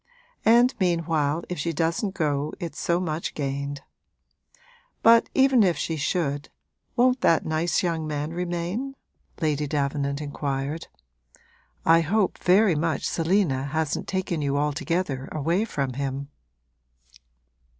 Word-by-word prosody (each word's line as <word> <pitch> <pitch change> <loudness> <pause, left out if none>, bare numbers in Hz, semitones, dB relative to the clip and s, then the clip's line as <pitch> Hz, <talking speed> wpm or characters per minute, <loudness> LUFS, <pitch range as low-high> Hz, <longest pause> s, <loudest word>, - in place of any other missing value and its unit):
And 240 +3 +6
meanwhile 165 -4 +1
if 180 - -5
she 165 +3 -1
doesn't 170 +5 -1
go 150 -2 -1
it's 165 -3 -6
so 170 0 +1
much 165 -2 -3
gained. 140 0 -3 1.2
But 230 0 +6
even 265 -2 +5
if 180 -5 +3
she 165 - -2
should, 145 -1 -1 0.5
won't 250 +1 +3
that 165 - +3
nice 160 +4 0
young 165 -3 -1
man 150 +1 -3
remain?' 180 +9 -3 0.5
Lady 150 -2 0
Davenant 140 -1 -1
inquired. 145 +1 -3 1.0
'I 165 +1 +6
hope 195 +4 0
very 190 +1 +4
much 155 0 -1
Selina 165 -6 +1
hasn't 155 +1 -2
taken 185 -4 -2
you 140 -1 0
altogether 150 -1 -1
away 165 +8 0
from 140 - -2
him.' 140 +1 -4
160 Hz, 120 wpm, -25 LUFS, 145-180 Hz, 1.2 s, And